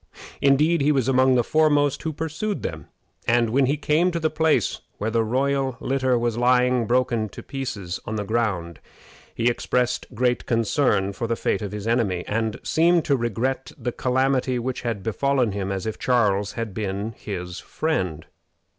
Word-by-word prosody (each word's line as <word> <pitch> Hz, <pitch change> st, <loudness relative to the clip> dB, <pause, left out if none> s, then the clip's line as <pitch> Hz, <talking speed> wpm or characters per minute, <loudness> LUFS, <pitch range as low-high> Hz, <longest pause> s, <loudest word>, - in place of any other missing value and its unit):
Indeed, 150 Hz, +4 st, +4 dB
he 145 Hz, +2 st, +3 dB
was 135 Hz, -4 st, +1 dB
among 130 Hz, 0 st, +4 dB
the 120 Hz, -, +3 dB
foremost 145 Hz, -1 st, +2 dB
who 160 Hz, -, -2 dB
pursued 160 Hz, +7 st, -3 dB
them; 80 Hz, -3 st, -5 dB, 0.4 s
and 115 Hz, -1 st, +3 dB
when 135 Hz, +2 st, +3 dB
he 145 Hz, +3 st, +1 dB
came 155 Hz, +4 st, +2 dB
to 170 Hz, -1 st, -2 dB
the 155 Hz, -1 st, 0 dB
place 155 Hz, -, +1 dB, 0.2 s
where 110 Hz, +2 st, -2 dB
the 115 Hz, 0 st, +2 dB
royal 135 Hz, +2 st, 0 dB
litter 130 Hz, -2 st, +1 dB
was 120 Hz, -1 st, -1 dB
lying, 125 Hz, -1 st, +3 dB
broken 120 Hz, -3 st, +1 dB
to -, -, -10 dB
pieces, 125 Hz, -10 st, -5 dB
on 110 Hz, -, -4 dB
the 105 Hz, -, -2 dB
ground, 100 Hz, -7 st, -1 dB, 0.6 s
he 115 Hz, -, +1 dB
expressed 120 Hz, 0 st, 0 dB
great 125 Hz, +1 st, 0 dB
concern 115 Hz, -4 st, +1 dB
for 115 Hz, -, -3 dB
the 115 Hz, -, 0 dB
fate -, -, -1 dB
of 105 Hz, -, -4 dB
his 105 Hz, 0 st, -6 dB
enemy, 110 Hz, -7 st, +1 dB
and 110 Hz, 0 st, -1 dB
seemed 170 Hz, 0 st, +3 dB
to 140 Hz, -, +3 dB
regret 125 Hz, +2 st, -2 dB
the 125 Hz, -, -3 dB
calamity 130 Hz, 0 st, +1 dB
which 125 Hz, +1 st, -3 dB
had 115 Hz, -5 st, -3 dB
befallen 125 Hz, +1 st, +1 dB
him 100 Hz, -1 st, -3 dB
as 95 Hz, +1 st, -3 dB
if 110 Hz, -, -4 dB
Charles 105 Hz, -5 st, +1 dB
had 115 Hz, -3 st, -4 dB
been 105 Hz, +1 st, -3 dB
his 90 Hz, -3 st, -6 dB
friend. 90 Hz, -, -2 dB
120 Hz, 175 wpm, -24 LUFS, 110-135 Hz, 0.6 s, Indeed